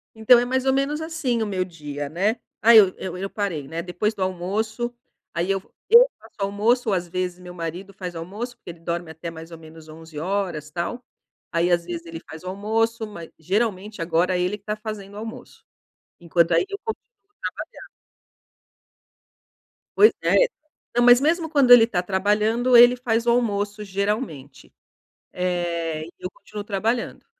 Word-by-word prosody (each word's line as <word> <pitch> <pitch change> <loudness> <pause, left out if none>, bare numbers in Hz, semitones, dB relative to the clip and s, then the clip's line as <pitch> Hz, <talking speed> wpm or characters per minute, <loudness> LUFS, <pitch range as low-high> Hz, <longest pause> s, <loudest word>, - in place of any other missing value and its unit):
Então 230 +2 +6
é 245 - 0
mais 260 +1 -1
ou 265 - +3
menos 285 +3 0
assim 315 -8 -1
o - - +1
meu 185 -2 -1
dia, 145 -5 -6
né? 200 +8 0 0.2
Ah 230 +1 +7
eu 195 -4 +8
eu 180 -1 -5
eu 195 +1 -4
parei, 170 -10 -3
né? 165 +2 -4
Depois 185 +5 -1
do 200 - -9
almoço 215 +6 -2 0.4
aí 175 +3 0
eu 195 -1 0 0.3
eu 485 +2 +9
faço - - -18
o - - +2
almoço 220 +4 +1
ou 195 - +2
às 175 -1 -2
vezes 180 0 -3
o - - -15
meu 180 0 -10
marido 175 +3 -6
faz 180 -2 -6
o - - -4
almoço, 215 +8 -6
porque - - -13
ele 165 - -15
dorme 170 0 -4
até 160 +1 -7
mais 165 0 -10
ou 165 - -8
menos 160 0 -14
11h 160 -1 -12 0.6
tal, 180 +9 -3 0.5
aí 170 +1 +1
às 170 -1 +2
vezes 170 -1 -6
ele 165 0 -7
faz 160 +2 -9
o - - -8
almoço, 220 +3 -1
ma 190 -5 -9 0.2
geralmente 200 +2 -2
agora 170 +2 +1
é - - 0
ele 185 +4 -1
que 200 - -32
tá 210 - -2
fazendo 215 -2 -7
o - - -8
almoço. 225 +1 -9 0.6
Enquanto 170 0 +2
aí - - +4
eu 400 - -5
continuo 445 - -2 0.8
trabalhando. - - -12 2.1
Pois 430 - +8
é. - - +3 0.6
Não, 240 - +4
mas 245 +1 +7
mesmo 325 +1 +1
quando 280 -6 +4
ele 235 -2 +10
tá 180 -6 0
trabalhando, 210 +6 +2
ele 240 +1 +9
faz 235 -2 0
o 240 - +3
almoço 210 -3 0
geralmente. 190 - -4 0.6
Eh, 170 -3 -2
e 170 - -12
eu 180 - -5
continuo 210 -1 -9
trabalhando. 220 +4 -2
195 Hz, 185 wpm, -23 LUFS, 170-230 Hz, 2.1 s, ele